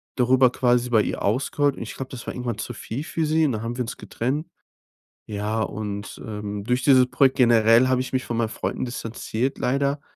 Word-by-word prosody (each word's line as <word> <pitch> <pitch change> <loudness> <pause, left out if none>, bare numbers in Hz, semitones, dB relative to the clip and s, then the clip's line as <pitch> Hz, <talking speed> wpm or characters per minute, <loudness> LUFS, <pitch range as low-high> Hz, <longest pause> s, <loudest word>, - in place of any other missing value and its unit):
darüber 130 0 +4
quasi 125 -1 +2
bei 110 -3 +4
ihr - - -3
ausgeheult. 135 +6 +1
Und - - -5
ich - - -7
glaube, 135 -1 -6
das 125 -3 -8
war - - -4
irgendwann 120 -3 -4
zu - - -5
viel 130 +7 -5
für 160 -1 -2
sie 160 +1 +3
und 140 - +1
dann 110 -1 -3
haben 120 +2 -4
wir 125 - 0
uns 120 - -6
getrennt. 145 +8 -3 0.8
Ja, 105 +1 -2
und, 105 -2 -5
ähm, 105 -1 -5
durch 125 +3 0
dieses 130 -2 +6
Projekt 135 -1 +3
generell 120 -1 +5
habe 130 -1 +2
ich 130 - -5
mich 130 - 0
von 115 - -3
meinen 115 -2 0
Freunden 130 - -3
distanziert 120 +2 -3
leider, 140 +2 0
125 Hz, 215 wpm, -24 LUFS, 110-130 Hz, 0.8 s, dieses